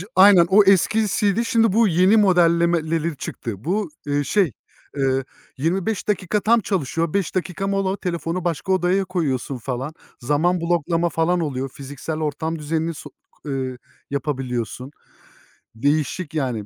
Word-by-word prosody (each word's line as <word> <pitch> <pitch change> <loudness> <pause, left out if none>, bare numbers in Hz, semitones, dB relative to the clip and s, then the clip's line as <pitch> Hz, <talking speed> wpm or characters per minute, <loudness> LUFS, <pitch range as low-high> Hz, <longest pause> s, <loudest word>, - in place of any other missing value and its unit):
aynen, 185 -2 +7
o 205 +2 +6
eskisiydi. 205 +2 +2
Şimdi 225 -4 +2
bu 225 +1 +4
yeni 185 +5 +4
modellemeleri 170 -4 +2
çıktı. 110 -5 -6
Bu, 205 - -1 0.2
ııı, 145 0 0
şey, 195 -5 +2 0.5
ııı, 135 -1 +1 0.3
25 185 +8 -1
dakika 205 0 0
tam 230 +3 +4
çalışıyor. 165 - -1
5 195 -2 -1
dakika 185 +1 -2
mola, 195 0 0
telefonu 170 -1 -3
başka 175 +3 -2
odaya 185 +1 +2
koyuyorsun, 145 -7 -2
falan. 130 +4 -4 0.3
Zaman 160 +7 +1
bloklama 170 0 +1
falan 170 +2 +1
oluyor. 135 -4 -2
Fiziksel 145 +4 -6
ortam 160 +1 -3
düzenini 160 +2 -2
so 150 - -10
k 150 - -15
ııı, 130 -2 -3 0.3
yapabiliyorsun. 130 -3 -3 0.8
Değişik 145 +6 -1
yani. 125 -9 -2
165 Hz, 135 wpm, -22 LUFS, 145-190 Hz, 0.8 s, aynen